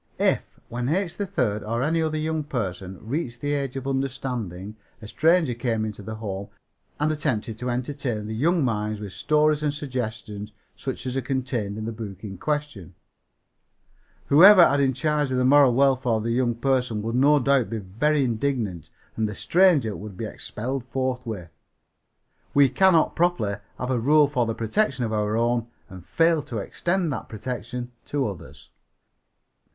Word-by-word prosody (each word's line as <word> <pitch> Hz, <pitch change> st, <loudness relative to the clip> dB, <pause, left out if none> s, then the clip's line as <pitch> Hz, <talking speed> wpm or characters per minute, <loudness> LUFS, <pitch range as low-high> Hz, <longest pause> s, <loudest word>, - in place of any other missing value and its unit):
"If, -, -, 0 dB
when 120 Hz, +2 st, -3 dB
H. 175 Hz, +2 st, 0 dB
3rd 125 Hz, -, -1 dB
or 115 Hz, +3 st, -2 dB
any 165 Hz, +3 st, +1 dB
other 155 Hz, -1 st, -1 dB
young 155 Hz, 0 st, -1 dB
person, 95 Hz, -, -4 dB
reached 125 Hz, -3 st, -3 dB
the 145 Hz, 0 st, -1 dB
age 140 Hz, -2 st, -2 dB
of 135 Hz, -1 st, -5 dB
understanding 125 Hz, -8 st, -3 dB, 0.2 s
a 110 Hz, -, -10 dB
stranger 160 Hz, +2 st, +3 dB
came 115 Hz, -2 st, -1 dB
into 105 Hz, -1 st, -6 dB
the 110 Hz, +2 st, -6 dB
home 100 Hz, -2 st, -5 dB, 0.5 s
and 150 Hz, +1 st, +2 dB
attempted 120 Hz, -8 st, -2 dB
to 125 Hz, -, -3 dB
entertain 125 Hz, -3 st, -3 dB
the 110 Hz, -, -4 dB
young 160 Hz, +6 st, +2 dB
mind 105 Hz, -2 st, -1 dB
with 105 Hz, -2 st, -7 dB
stories 150 Hz, 0 st, +2 dB
and 150 Hz, -1 st, +1 dB
suggestions 115 Hz, -7 st, -5 dB, 0.2 s
such 130 Hz, 0 st, -5 dB
as 130 Hz, 0 st, -3 dB
are 135 Hz, -, 0 dB
contained 125 Hz, -6 st, -2 dB
in 110 Hz, -, -4 dB
the 115 Hz, -, -3 dB
book 105 Hz, -4 st, -8 dB
in 95 Hz, -3 st, -7 dB
question, 150 Hz, -, -3 dB, 1.3 s
whoever 180 Hz, +5 st, +8 dB
had 140 Hz, -, +1 dB
in 135 Hz, -1 st, +2 dB
charge 150 Hz, 0 st, 0 dB
the 125 Hz, -1 st, +1 dB
moral 135 Hz, -2 st, +6 dB
welfare 130 Hz, -3 st, +3 dB
of 110 Hz, -1 st, 0 dB
the 115 Hz, -, -1 dB
young 120 Hz, -1 st, +1 dB
person 125 Hz, -3 st, 0 dB
would 115 Hz, +1 st, -2 dB
no 140 Hz, +4 st, +5 dB
doubt 135 Hz, -3 st, +2 dB
be 115 Hz, -, -3 dB
very 125 Hz, +10 st, 0 dB
indignant 115 Hz, -, -2 dB, 0.3 s
and 110 Hz, -1 st, 0 dB
the 105 Hz, -, -6 dB
stranger 140 Hz, -, +3 dB
would 100 Hz, -2 st, -9 dB
be 115 Hz, -, -3 dB
expelled 125 Hz, +4 st, -4 dB
forthwith. 125 Hz, -9 st, -3 dB, 1.0 s
We 140 Hz, -1 st, +6 dB
cannot 170 Hz, +4 st, +4 dB
properly 165 Hz, -, +1 dB, 0.2 s
have 125 Hz, +1 st, -3 dB
a 125 Hz, -, +1 dB
rule 145 Hz, +5 st, +5 dB
for 125 Hz, -5 st, 0 dB
the 115 Hz, -, -2 dB
protection 125 Hz, -, 0 dB
of 110 Hz, -, -3 dB
our 105 Hz, 0 st, 0 dB
own 120 Hz, 0 st, +1 dB, 0.2 s
and 90 Hz, -2 st, -10 dB
fail 165 Hz, -, +2 dB
to 120 Hz, -, -5 dB
extend 170 Hz, -, -1 dB
that 115 Hz, -, -6 dB
protection 120 Hz, +2 st, -5 dB
to 140 Hz, -4 st, -1 dB
others." 80 Hz, -6 st, -10 dB
125 Hz, 170 wpm, -25 LUFS, 110-145 Hz, 1.3 s, whoever